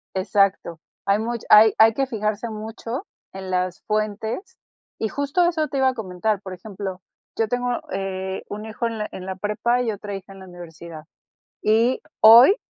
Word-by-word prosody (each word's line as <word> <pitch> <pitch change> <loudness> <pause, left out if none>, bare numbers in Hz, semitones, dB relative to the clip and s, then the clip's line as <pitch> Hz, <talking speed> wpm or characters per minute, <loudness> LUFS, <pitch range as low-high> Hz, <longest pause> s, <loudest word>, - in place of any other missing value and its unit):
Exacto. 190 -3 +1 0.3
Hay 200 +1 +3
much 235 +1 -3
hay 215 +1 +8
hay 225 0 +6
que 270 +3 0
fijarse 215 -1 -2
mucho 225 - -6 0.3
en 190 -1 -7
las 180 0 -1
fuentes, 215 - -2 0.4
y 220 - -1
justo 285 - +1
eso 315 -3 0
te 280 - -4
iba 265 -1 +4
a 260 - -2
comentar. 205 -1 -2
Por 190 -2 -7
ejemplo, 190 0 -7 0.4
yo 225 - +1
tengo, 245 +2 -1 0.2
eh, 190 0 -4
un 210 +1 -6
hijo 220 +2 -3
en 230 - -5
la 210 - -2
en 185 - -8
la 190 0 -4
prepa 210 +5 0
y 230 - 0
otra 205 -1 -6
hija 195 0 -9
en 195 - -13
la 190 - -11
universidad. 170 -2 -10 0.6
Y 230 +4 +3 0.2
hoy 235 - +9
215 Hz, 180 wpm, -23 LUFS, 190-230 Hz, 0.6 s, hoy